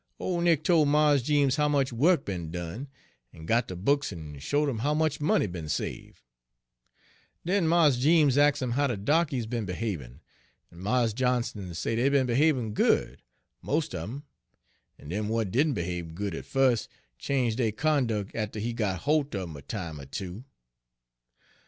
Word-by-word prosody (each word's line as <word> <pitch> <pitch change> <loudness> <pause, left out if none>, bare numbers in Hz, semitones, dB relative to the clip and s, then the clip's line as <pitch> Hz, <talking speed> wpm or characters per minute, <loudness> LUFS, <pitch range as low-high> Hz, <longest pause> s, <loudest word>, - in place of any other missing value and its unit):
Ole 175 -2 -1
Nick 165 -3 +3
tol' 160 -4 +4
Mars 150 -1 +4
Jeems 140 0 +2
how 150 0 +3
much 140 -3 +1
wuk 155 +6 +3
be'n 90 -5 -4
done, 90 - -5 0.5
en 80 - -11
got 115 +7 +1
de 90 - -6
books 140 +10 +1
en 75 -5 -8
showed 145 - 0
'im 125 -6 -2
how 145 +6 0
much 155 -2 0
money 150 - +2
be'n 85 -5 -6
save'. 75 - -5 1.2
Den 180 -1 +1
Mars 160 -6 +4
Jeems 150 -1 +4
ax' 145 -1 +3
'im 125 - -2
how 140 +4 +2
de 120 -5 -2
darkies 140 +2 +1
be'n 115 -2 -3
behabin', 90 - -4 0.5
en 85 - -14
Mars 115 +3 +1
Johnson 120 -6 -1
say 115 - -2
dey 125 +4 +3
be'n 140 -2 +3
behabin' 125 -3 +2
good, - - +1 0.4
most 150 -3 -1
un 90 - -3
'em, 140 +5 -7 0.7
en 75 - -12
dem 105 +5 -2
w'at 110 -3 -1
didn' 145 +4 +2
behabe 85 -1 -4
good 100 0 -3
at - - -6
Page - - -24
94 135 -1 +5
fus' 115 - -3 0.3
change 125 -5 0
dey 115 -3 +1
conduc' 115 -7 0
atter 110 -1 -3
he 115 +3 -2
got 100 -6 -2
holt 145 -3 +1
un 95 -3 -4
'em 80 - -9
a 70 - -9
time 85 -5 -6
er 70 - -9
two. 95 - -6
120 Hz, 185 wpm, -28 LUFS, 95-145 Hz, 1.2 s, 94